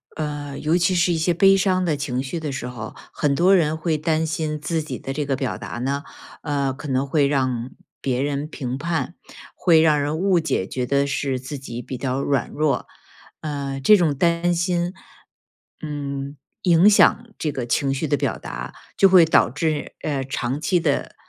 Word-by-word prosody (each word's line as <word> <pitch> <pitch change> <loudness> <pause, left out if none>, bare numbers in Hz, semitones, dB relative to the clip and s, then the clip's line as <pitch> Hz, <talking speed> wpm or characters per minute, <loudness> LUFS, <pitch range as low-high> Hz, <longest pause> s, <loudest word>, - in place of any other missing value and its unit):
呃， 145 -2 -4
尤 160 +3 +2
其 180 +1 +2
是 175 0 +3
一 165 - 0
些 170 +2 +1
悲 195 +3 +5
伤 185 -1 +2
的 155 -3 +1
情 135 -2 -2
绪 150 +5 -4
的 150 -3 -4
时 125 -1 -4
候， 110 -3 -7 0.2
很 140 -2 +1
多 185 +4 +5
人 155 -3 +2
会 160 -1 0
担 160 +1 0
心 155 -1 -2
自 160 +1 -1
己 155 - -5
的 135 - -6
这 150 +1 -2
个 135 -1 0
表 130 -1 -3
达 - - -7
呢， 140 +3 -2 0.4
呃， 140 -3 -1
可 130 +3 -9
能 135 +1 0
会 140 0 +2
让 130 -3 -1 0.3
别 130 -1 0
人 145 +1 -2
评 130 -4 -4
判， 165 0 -2 0.4
会 165 -3 +4
让 150 -2 +4
人 150 +2 -1
误 185 -1 +3
解， 155 -12 -1
觉 125 +4 -3
得 140 +2 +2
是 135 -1 -1
自 135 +2 -7
己 120 -2 -6
比 130 +1 -6
较 130 +1 -2
软 140 -3 0
弱。 150 -1 0 0.5
呃， 140 -3 -4
这 210 +10 +6
种 160 -6 +1
担 170 +1 +2
心， 175 +1 0 0.9
嗯， 140 -2 -5 0.3
影 175 +3 +6
响 235 +3 +4
这 150 - -2
个 130 -3 -4
情 135 +2 +1
绪 145 +3 -2
的 145 - +2
表 - - -1
达， - - -7 0.2
就 195 - +7
会 180 -3 +8
导 160 - +4
致， 150 +1 -2
呃， 140 -3 -2
长 135 +1 -3
期 165 +4 +1
的， - - -1
145 Hz, 210 characters per minute, -22 LUFS, 135-165 Hz, 0.9 s, 会